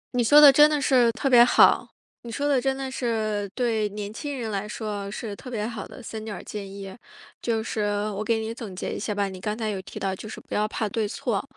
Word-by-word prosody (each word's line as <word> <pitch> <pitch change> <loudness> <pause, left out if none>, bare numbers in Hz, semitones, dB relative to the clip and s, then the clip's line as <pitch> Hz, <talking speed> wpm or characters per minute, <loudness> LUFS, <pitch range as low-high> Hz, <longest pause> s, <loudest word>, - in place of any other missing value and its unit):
你 245 - +3
说 290 +6 +7
的 295 -2 +10
真 295 +2 +7
的 300 -1 +1
是 250 -4 +4
特 275 - -2
别 245 -3 +8
好， 245 - +5 0.3
你 235 - -9
说 285 +5 -1
的 270 -3 +2
真 270 0 0
的 270 -1 -4
是， 215 -5 -2
对 225 -4 0
年 205 0 -6
轻 280 +3 -5
人 225 -2 -3
来 200 0 -3
说 210 -3 -5
是 210 0 -6
特 255 - -10
别 215 -4 -3
好 225 -3 -6
的 255 - -12
3 220 -1 -7
点 215 -2 -6
儿 - - -10
建 200 -2 -7
议。 195 -1 -8 0.5
就 225 -2 -1
是， 220 -1 -3 0.3
我 205 +2 -4
给 225 +1 +1
你 220 +1 -4
总 225 -6 -8
结 - - -4
一 - - -4
下 210 0 -3
吧， 200 -1 0
你 190 -1 -8
刚 210 +1 -3
才 220 -2 -2
有 195 -2 -3
提 - - -11
到 190 -1 -1
就 215 - -9
是 - - -8
不 - - -11
要 210 0 +1
怕 215 0 -2
对 215 +1 -1
错， 210 0 -2
220 Hz, 275 characters per minute, -25 LUFS, 205-245 Hz, 0.5 s, 的